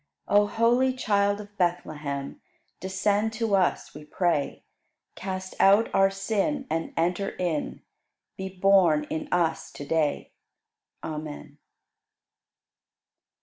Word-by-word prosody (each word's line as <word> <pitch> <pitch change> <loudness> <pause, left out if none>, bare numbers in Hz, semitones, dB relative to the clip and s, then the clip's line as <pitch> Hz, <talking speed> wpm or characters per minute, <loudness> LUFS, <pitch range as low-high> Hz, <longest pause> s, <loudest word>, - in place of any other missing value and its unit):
98. 205 0 +5
O 205 - 0
holy 240 +4 +2
Child 205 -4 +1
of 205 0 -14
Bethlehem, 155 - -2 0.4
Descend 200 +3 0
to 220 -2 0
us, 185 -2 0
we 150 - -10
pray; 150 -1 -1 0.5
Cast 185 0 -5
out 200 +4 +5
our 195 0 +5
sin 215 +8 -1
and 165 0 -2
enter 175 +4 0
in. 170 -5 -3 0.5
Be 190 0 -5
born 185 -5 +4
in 160 - -3
us 170 -2 0
to 145 - -8
day. 155 -1 0 0.7
Amen. 155 -1 -7
190 Hz, 110 wpm, -26 LUFS, 160-205 Hz, 0.7 s, 98